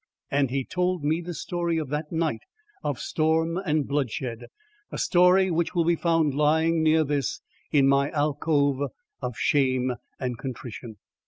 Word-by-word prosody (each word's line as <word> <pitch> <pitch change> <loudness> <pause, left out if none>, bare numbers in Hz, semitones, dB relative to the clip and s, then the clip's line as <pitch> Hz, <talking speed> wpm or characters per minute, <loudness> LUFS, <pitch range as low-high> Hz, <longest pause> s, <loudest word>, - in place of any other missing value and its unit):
And 140 -2 +2
he 135 0 -2
told 180 -2 -1
me 155 +3 +1
the 175 0 -6
story 170 -1 -2
of 155 -4 -3
that 150 +1 -3
night 160 -9 -1 0.4
of - - -1
storm 160 +2 0
and 155 -6 0
bloodshed, 130 -4 -2 0.5
a - - -5
story 180 +1 +4
which 170 +1 -1
will 170 -1 +2
be 170 0 +3
found 165 -3 +1
lying 160 +3 +2
near 160 0 +4
this, 145 -4 -1 0.3
in 140 -2 +4
my 140 +1 +3
alcove 145 -2 +1 0.3
of 125 -3 -4
shame 130 -3 +2 0.3
and 125 -3 -3
contrition. 120 -4 -7
150 Hz, 155 wpm, -26 LUFS, 135-165 Hz, 0.5 s, story